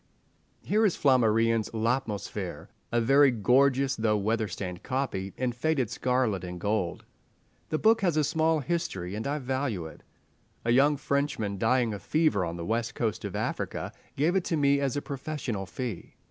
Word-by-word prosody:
Here 215 +2 +2
is 205 -5 +3
Flammarion's 115 -4 +3
"L'Atmosphere"—a 115 0 -3
very 135 +4 +6
gorgeous 130 +3 +3
though 110 -1 +1
weather 110 +2 0
stained 90 -1 -6
copy 125 -8 -2
in 125 -1 0
faded 130 -1 0
scarlet 125 -7 0
and 90 0 -6
gold. 100 -3 -1 0.6
The 155 - 0
book 225 +5 +4
has 175 -5 +1
a 155 - +4
small 160 +1 +1
history, 120 - -3
and 110 +4 -3
I 145 +2 -1
value 130 - -2
it. 80 - -11 0.6
A 115 - +2
young 140 +4 +4
Frenchman, 135 -9 -1
dying 120 0 +2
of 100 - -6
fever 155 - +2
on 85 0 -4
the 85 - -5
west 115 +2 -1
coast 115 -7 -2
of - - -5
Africa, - - -3 0.2
gave 160 +6 +2
it 190 - +2
to 165 - 0
me 140 -1 +3
as 140 -1 -1
a 145 - -3
professional 135 -8 -4
fee. 120 -6 -6
125 Hz, 165 wpm, -28 LUFS, 105-140 Hz, 0.6 s, very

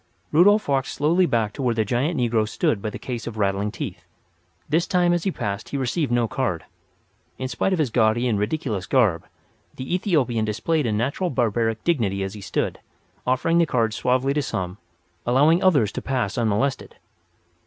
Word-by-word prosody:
Rudolf 205 +7 +5
walked 135 -2 +1
slowly 170 +5 +2
back 110 -5 0
to - - -6
where 120 -3 +1
the 110 -1 +1
giant 135 - 0
negro 115 -3 +1
stood 105 -2 0
by 110 - -2
the - - -7
case 120 -3 -5
of 115 -2 -6
rattling 100 0 0
teeth. - - -6 0.6
This 165 +3 +1
time 175 -2 +3
as 175 +1 -1
he 195 - +1
passed 100 - -4
he 140 - -3
received 135 +1 -1
no 120 -1 +2
card. - - -2 0.7
In 130 - -3
spite 195 - -1
of 185 - +1
his 150 -7 0
gaudy 115 +1 +2
and 110 -4 +1
ridiculous 105 - -2
garb, 105 -11 +2 0.5
the 130 +6 -5
Ethiopian 145 - +1
displayed 120 +7 0
a - - 0
natural 135 - -1
barbaric 115 -4 0
dignity 105 - 0
as 95 0 -4
he 105 - -9
stood, 95 - -2 0.5
offering 145 +7 +2
the 170 - +3
cards 115 -5 0
suavely 130 +3 +1
to 150 - +1
some, 95 -7 -4 0.4
allowing 145 +8 +4
others 140 - +4
to - - -5
pass 125 -7 -1
unmolested. 115 +4 -1
125 Hz, 185 wpm, -23 LUFS, 110-150 Hz, 0.7 s, Rudolf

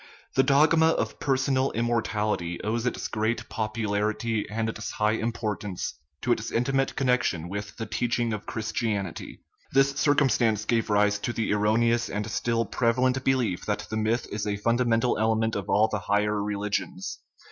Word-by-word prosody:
i - - -19 0.3
The - - +8
dogma 155 +4 +5
of 160 - 0
personal 135 -1 +1
immortality 110 -6 -1
owes 115 +3 -1
its 125 - -2
great 110 +1 -1
popularity 110 0 -1
and 110 +1 -1
its 110 -1 -5
high 105 0 +2
importance 110 -4 -3 0.3
to 125 - +1
its 115 -1 0
intimate 135 +3 0
con 135 - -1
nection 90 -10 +1
with 100 +1 -6
the 115 - -3
teaching 120 +1 -1
of 105 -1 -6
Christianity. 110 -5 -3 0.3
This 135 +1 +4
cir 145 +1 +2
cumstance 115 -7 +2
gave 115 -2 +1
rise 105 0 +3
to 120 - -2
the 115 -2 -1
erroneous 115 +3 +2
and 105 +1 -2
still 115 0 0
preva 115 +3 +1
lent 130 +1 +2
belief 125 -9 +1
that 105 -1 -1
the 110 - -1
myth 110 +3 0
is 105 0 -3
a 100 -1 -1
fundamental 115 +2 +1
element 110 0 +1
of 100 0 -4
all 105 +3 +4
the 105 -1 -2
higher 105 +1 +1
religions. 100 -2 -3
110 Hz, 170 wpm, -26 LUFS, 105-120 Hz, 0.3 s, The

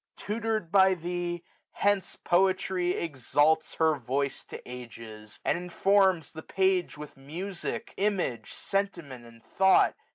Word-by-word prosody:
Tutor'd 215 -4 -2
by 190 -1 +5
thee, 175 0 -4 0.3
hence 205 -2 0
Poetry 185 0 +1
exalts 155 +1 +1
Her 160 -1 +3
voice 135 +1 -2
to - - -8
ages; 115 -4 -10
and - - +1
informs 185 -1 +2
the 160 - -8
page 190 -2 0
With 150 -2 -10
music, 170 +8 -6
image, 195 - -1
sentiment, 170 -12 -3
and 115 0 -17
thought. 190 0 +4
175 Hz, 120 wpm, -28 LUFS, 140-190 Hz, 0.3 s, by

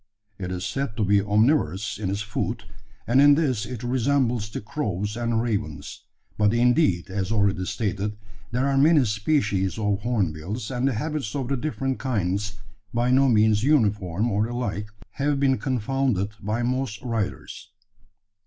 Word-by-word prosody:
It 90 -1 -4
is 90 0 -3
said 135 -6 -3
to 105 - +1
be 100 +1 +4
omnivorous 105 - +1
in 100 -4 -2
its 100 +2 -2
food; 115 +2 -3 0.4
and 130 +4 +4
in 145 0 +7
this 130 -9 0
it 125 -2 -6
resembles 125 -3 +1
the - - -5
crows 105 - -3
and 115 -1 0
ravens: 80 -11 -4 0.3
but, 105 +1 +3
indeed, 120 - +2
as 95 +1 -2
already 100 -4 +1
stated, 105 0 -2 0.3
there 125 +3 0
are 135 -1 +2
many 150 -1 +5
species 105 - 0
of 105 -2 0
hornbills, 105 -1 -2
and 125 +1 0
the 135 - +1
habits 150 -3 -3
of 135 -3 -2
the 140 - +1
different 135 -1 -2
kinds, 105 -4 -1 0.3
by 120 +2 +1
no 135 +1 +5
means 110 -1 +4
uniform 105 - +2
or 105 +2 +1
alike, 105 -4 -3 0.2
have 140 0 0
been 135 -2 +2
confounded 130 -5 0
by 110 +4 -1
most 130 -2 -1
writers. 115 -6 -4
110 Hz, 155 wpm, -25 LUFS, 100-130 Hz, 0.4 s, in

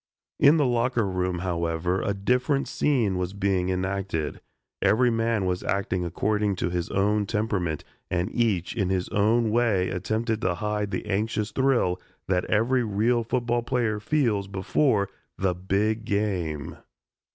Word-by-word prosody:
In 145 +3 +6
the 150 - +3
locker 120 -2 +1
room, 90 -1 -1
however, 85 +1 -1
a 100 - -1
different 125 +7 +1
scene 115 -11 +1
was 90 +1 -2
being 95 -2 0
enacted. 95 -4 -2 0.4
Every 125 +3 +4
man 115 -3 0
was 90 -1 -1
acting 95 -2 -1
according 105 +3 0
to 90 -1 -2
his 90 -1 -2
own 105 +1 +1
temperament 100 -7 -1 0.3
and 90 +3 -1
each 105 -7 0
in 100 -5 0
his 95 -1 -1
own 110 +2 +2
way 110 -6 +2
attempted 110 +4 -1
to 90 -1 +1
hide 105 +1 -2
the - - -3
anxious 105 +1 -1
thrill 125 -8 +1 0.3
that 90 -1 +1
every 120 +4 +2
real 115 +3 +1
football 120 0 0
player 115 -3 0
feels 110 -5 +1
before 100 +3 +1 0.3
"the 95 -1 +1
big 100 +5 0
game." 95 - -2
105 Hz, 145 wpm, -26 LUFS, 95-115 Hz, 0.4 s, In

